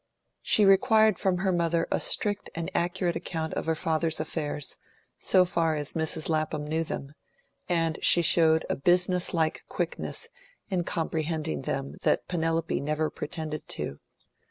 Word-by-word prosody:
She 210 - +4
required 215 0 +5
from 190 -2 +1
her 190 +1 0
mother 170 -1 +1
a - - +1
strict 205 -1 +2
and 165 0 -4
accurate 175 0 0
account 165 -2 -4
of - - -3
her 160 - +1
father's 160 0 0
affairs, 150 -2 -3 0.4
so 185 -1 +4
far 165 -3 0
as 145 -1 -1
Mrs 160 0 -1
Lapham 155 -2 -1
knew 160 +2 -1
them; 140 -2 -6 0.6
and 165 -2 0
she 175 - +5
showed 160 -1 +4
a - - -1
business 180 +3 +2
like 160 -3 0
quickness 465 - -3 0.4
in 180 -2 0
comprehending 160 -2 -2
them 135 +1 -4
that - - +1
Penelope 165 -1 -1
had - - -2
never 155 +1 -1
pretended 155 -1 -5
to. 70 - -4
165 Hz, 155 wpm, -27 LUFS, 155-175 Hz, 0.6 s, required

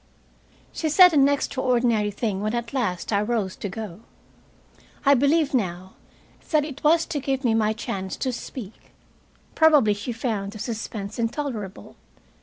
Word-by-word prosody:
She 315 - -2
said 360 +3 +7
an 280 -2 +5
extraordinary 245 -6 +1
thing, 205 -1 -2
when 215 +3 -1
at 235 +1 -4
last 210 -7 -2
I 200 - +3
rose 210 -4 -1
to 205 - -4
go. 205 -2 -7 1.1
I 280 - +7
believe 285 +3 +2
now 185 -6 -2 0.6
that 305 -2 +2
it 285 -2 -9
was 325 +2 +4
to 295 - -3
give 270 0 -2
me 235 -3 +2
my 215 -1 +2
chance 195 -4 -4
to 255 - -2
speak. 225 -3 -9 0.6
Probably 300 -9 +5
she 205 +4 -5
found 220 -4 -3
the - - -8
suspense 215 -2 -5
intolerable. 230 -5 -4
235 Hz, 150 wpm, -24 LUFS, 205-275 Hz, 1.1 s, said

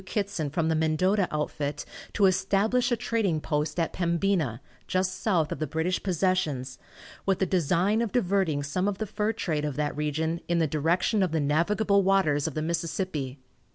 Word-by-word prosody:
Kittson 200 - -2
from 160 +1 0
the 160 - +2
Mendota 175 +5 +2
outfit 150 -1 -3 0.3
to 205 - +3
establish 200 +7 +2
a - - +4
trading 220 -8 0
post 150 +2 -2
at 165 - 0
Pembina, 170 - 0 0.3
just 185 0 -1
south 170 -8 +1
of - - -4
the 155 - -1
British 160 +5 -1
possessions, 155 -9 -1 0.5
with 195 -1 +3
the 190 - +1
design 185 +4 +2
of 230 -4 -1
diverting 190 - +1
some 180 +7 -1
of 205 -2 -1
the 220 - -2
fur 210 +1 -1
trade 160 -9 -2
of 150 -3 -2
that 150 0 -1
region 160 +3 -1
in 175 - +1
the 165 - +3
direction 165 +8 +1
of 185 -3 +1
the 160 - +2
navigable 200 +8 +2
waters 185 -7 +2
of 160 - -5
the 155 - -1
Mississippi. 160 -4 -2
170 Hz, 180 wpm, -27 LUFS, 150-195 Hz, 0.5 s, a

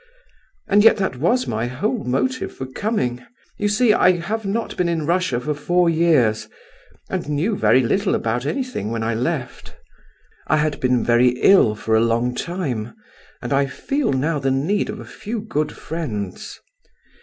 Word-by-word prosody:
And 205 +1 +4
yet 225 - +6
that 190 -10 -2
was 235 - +1
my 115 +1 -2
whole 205 - -2
motive 255 - -1
for 130 - -5
coming. 130 - -2 0.4
You 205 - +1
see 215 +2 +3
I 185 - +5
have 200 +5 -3
not 225 +3 -2
been 175 -1 0
in 165 -3 -1
Russia 170 -6 +1
for 150 +5 -2
four 175 +4 +1
years, 155 -10 +2 0.6
and - - -4
knew 160 +9 0
very 130 -8 +3
little 190 - +1
about 115 +2 -1
anything 250 - -3
when 115 0 -3
I 115 +1 0
left. 125 +4 -4 0.7
I 155 - +3
had 150 -1 0
been 125 -1 +1
very 125 +1 +3
ill 150 - +5
for 110 +1 0
a 110 - +4
long 115 +2 +1
time, 135 - -4 0.5
and 120 - -2
I 140 0 +2
feel 275 - -2
now 150 +4 0
the 135 -1 0
need 150 +10 0
of - - -5
a - - -9
few 225 +2 -6
good 155 -9 -2
friends. 110 - -6
150 Hz, 170 wpm, -21 LUFS, 125-195 Hz, 0.7 s, yet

